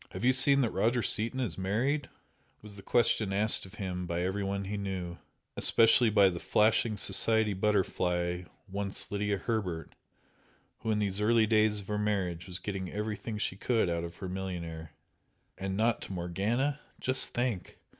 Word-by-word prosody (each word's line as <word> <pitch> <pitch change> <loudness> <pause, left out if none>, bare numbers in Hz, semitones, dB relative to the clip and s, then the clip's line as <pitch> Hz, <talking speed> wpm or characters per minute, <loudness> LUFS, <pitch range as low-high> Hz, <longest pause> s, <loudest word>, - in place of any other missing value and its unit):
"Have - - -4
you 130 - +5
seen 140 +1 +4
that 120 - 0
Roger 120 +1 +1
Seaton 115 +4 +1
is 110 -9 -2
married?" 125 +9 -1 0.5
was 105 -1 -11
the 100 - -11
question 110 -2 +2
asked 105 0 +2
of 95 - -14
him 90 -2 -4
by 85 +1 -2
every 95 +2 -2
one 100 0 -2
he 100 +2 -4
knew, 95 -4 -5 0.4
especially 115 +1 +6
by 100 -2 +5
the 85 -2 -5
flashing 110 +2 +2
society 105 +2 +3
butterfly 90 -3 0 0.2
once 100 0 -3
Lydia 105 0 -1
Herbert, 95 -7 -3 0.9
who 110 - -5
in 110 - +1
these 100 -1 -1
early 110 +1 +4
days 110 -1 +2
of 95 - -14
her 105 0 -2
marriage 95 -5 -2
was 90 -1 -4
getting 95 -2 -5
everything 105 +1 -4
she 100 - -2
could 110 -1 0
out 85 0 -2
of 85 0 -7
her 95 - -7
millionaire 85 -4 -5 0.7
"And 95 0 -4
NOT 115 +1 +1
to - - -7
Morgana! 105 +11 -1 0.2
Just 130 +1 +2
think! 120 -6 -2
100 Hz, 170 wpm, -30 LUFS, 95-110 Hz, 0.9 s, especially